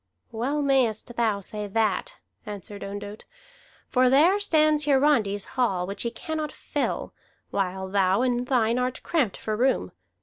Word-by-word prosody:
"Well 275 +6 -1
mayest 245 -4 +1
thou 220 -4 +1
say 210 +2 -5
that," 210 -2 0 0.3
answered 205 0 -8
Ondott, 205 +1 -7 0.6
"for 255 0 +3
there 325 +10 +5
stands 310 -6 +3
Hiarandi's 265 -8 +2
hall, 235 -9 0
which 200 +3 -6
he 235 - 0
cannot 310 +4 -4
fill, - - -3 0.4
while 190 -1 -2
thou 195 +2 +2
in 245 -1 0
thine 245 -2 +2
art 250 0 -2
cramped 280 - 0
for 215 - -3
room. 260 +4 +1
235 Hz, 140 wpm, -26 LUFS, 205-270 Hz, 0.6 s, there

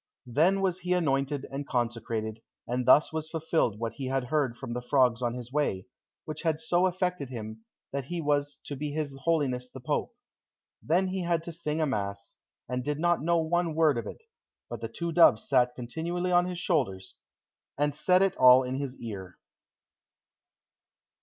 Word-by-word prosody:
Then 165 +11 +2
was 185 -2 0
he 180 0 -1
anointed 140 -5 0
and 140 +1 -5
consecrated, 115 -2 -2 0.3
and 125 +1 -2
thus 150 +4 +6
was 160 0 -3
fulfilled 160 -9 0
what 115 0 -3
he 135 - -4
had 135 0 0
heard 130 -2 0
from 125 -3 -6
the 125 - -3
frogs 125 -1 +2
on 120 -1 -1
his 125 0 -8
way, 145 -11 0 0.4
which 155 - -6
had 160 -3 0
so 175 +3 +2
affected 180 -6 -2
him, 110 -2 -7 0.3
that 140 -1 -3
he 175 +4 -4
was 145 -2 0
to 145 - -6
be 150 +2 -3
his 150 -3 -3
Holiness 135 -7 0
the 130 - -10
Pope. 125 - -2 0.7
Then 180 +5 +1
he 190 0 -2
had 170 -2 0
to 170 - -6
sing 160 -1 -3
a - - +3
mass, 100 -6 -4 0.3
and 125 0 -2
did 145 +2 -2
not 175 +1 +2
know 170 +2 +2
one 165 0 0
word 155 -3 +4
of - - -6
it, - - -9 0.5
but - - -5
the - - -4
two 170 0 -4
doves 160 -9 +5
sat 125 -2 +3
continually 170 +9 -3
on 175 0 +4
his 180 -1 -4
shoulders, 95 - -1 0.6
and 145 0 +1
said 180 +6 +3
it 195 - +1
all 130 0 +8
in 130 +1 -3
his 135 -2 -4
ear. 95 -5 -7
145 Hz, 185 wpm, -28 LUFS, 125-165 Hz, 0.7 s, all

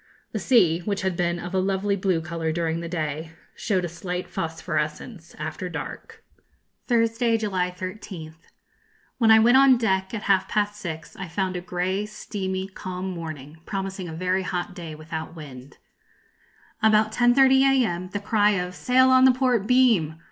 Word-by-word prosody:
The - - -3
sea, 180 -11 +4
which 200 +2 -3
had 190 -2 0
been 175 0 0
of 175 +1 -7
a 190 - +2
lovely 195 +1 0
blue 185 -4 0
colour 160 0 -3
during 165 0 -1
the 170 0 -6
day, 160 -1 -4 0.2
showed 185 -4 -1
a - - -2
slight 180 +1 -5
phosphorescence 160 +2 -4
after 185 - -5
dark. 165 - -8 0.6
Thursday, 230 -1 +2
July 190 -5 -1
13th. 180 -3 -8 0.7
When 225 -2 +4
I 220 - +9
went 235 +4 +6
on 270 -2 +6
deck, 190 -5 0
at 215 - -5
half 195 -1 +2
past 205 -1 0
six, 160 -5 -7
I 190 - -6
found 185 +2 -2
a 180 - -3
grey, 185 +3 -2
steamy, 190 -3 -4
calm 185 -1 -6
morning, 155 -3 -8
promising 195 -2 -4
a - - -7
very 185 +3 0
hot 180 -1 -3
day, 165 -3 -8
without 160 +1 -7
wind. 140 -4 -11 1.0
About 215 0 +4
10.30 260 +3 +5 0.2
a.m., 180 -3 -3
the 205 - -3
cry 210 0 +2
of 180 -1 -3
'Sail 260 +6 +3
on 260 0 +6
the 260 - +8
port 250 -5 +1
beam!' 230 -12 +3
185 Hz, 165 wpm, -24 LUFS, 170-215 Hz, 1.0 s, I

